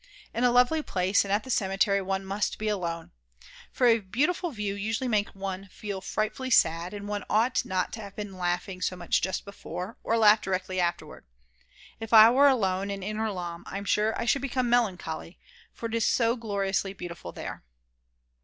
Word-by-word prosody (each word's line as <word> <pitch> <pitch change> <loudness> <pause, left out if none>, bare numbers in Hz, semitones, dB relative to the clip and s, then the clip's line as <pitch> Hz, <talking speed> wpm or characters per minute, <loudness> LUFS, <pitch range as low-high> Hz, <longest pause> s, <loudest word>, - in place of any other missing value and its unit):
In 235 - -1
a 250 - +6
lovely 250 +6 +4
place 190 -6 +1
and 200 - -5
at 205 +2 +1
the 260 - -5
cemetery 195 -2 +2
one 195 0 -2
must 195 +1 -2
be 215 - -3
alone. 170 -5 -3 0.6
For 255 - +1
a 230 -1 +5
beautiful 295 - 0
view 210 -7 -3
usually 220 +5 -2
makes 210 -4 0
one 195 0 -5
feel 195 0 -6
frightfully 215 +6 -2
sad, 170 -5 +3
and 205 -1 -7
one 205 -1 -3
ought 230 +4 +2
not 185 -1 -1
to 225 - -6
have 200 -1 -10
been 205 -2 -6
laughing 180 +1 -2
so 185 - -1
much 175 -1 0
just 190 +1 -2
before, 190 0 -7
or 230 - +1
laugh 215 -1 +6
directly 185 0 -2
afterwards. 175 - -3 0.7
If 225 0 -6
I 220 +1 +10
were 280 +3 +6
alone 195 -7 +1
in 200 -1 -4
Inner 215 +2 -2
Lahn 175 -2 -6
I'm 200 +1 -5
sure 210 +2 +1
I - - -1
should 275 +3 +2
become 255 -3 -1
melancholy, 180 -8 -1 0.3
for - - -8
it 225 - -3
is 230 -1 +1
so 230 -1 +2
gloriously 200 -4 -1
beautiful 170 - -8
there. - - -7
200 Hz, 190 wpm, -27 LUFS, 185-225 Hz, 0.7 s, I